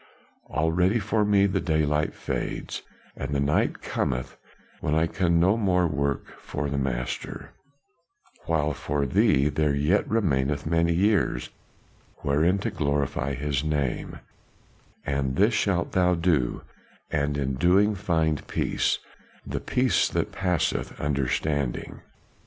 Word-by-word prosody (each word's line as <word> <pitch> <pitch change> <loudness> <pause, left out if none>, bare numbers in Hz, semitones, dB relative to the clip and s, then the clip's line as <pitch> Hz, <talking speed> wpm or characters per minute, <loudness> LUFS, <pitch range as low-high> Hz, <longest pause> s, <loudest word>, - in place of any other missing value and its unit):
Already 90 +7 +2
for 105 0 +1
me 100 -1 +4
the 95 - 0
daylight 75 -2 0
fades - - -4 0.3
and 70 - -4
the - - +1
night 70 +2 +1
cometh 65 -1 -2 0.4
when 75 - 0
I 80 +1 +3
can 85 -1 +1
no 95 +5 +4
more 90 -5 +2
work 70 -3 -2
for 70 0 -4
the 70 - -1
Master, 60 -2 -4 1.0
while 75 -2 +1
for 70 +1 -2
thee 70 +2 +3
there 75 -1 +1
yet 75 +8 +1
remaineth 75 -9 +1
many 85 +2 +2
years 95 - +1 0.7
wherein 80 +7 +2
to - - 0
glorify 70 -2 -1
his 70 0 -1
name; 75 -4 -2 0.9
and 70 -2 -1
this 105 +4 +3
shalt 90 -5 0
thou 90 -1 +3
do, 85 -8 +1 0.5
and 75 -2 0
in 70 -1 -1
the 65 - -6
doing 100 +6 +4
find 80 -6 0
peace - - 0 0.5
the - - -3
peace 125 0 +2
that - - -1
passeth 90 -4 -1
understanding." 70 -1 -1
75 Hz, 130 wpm, -26 LUFS, 70-90 Hz, 1.0 s, me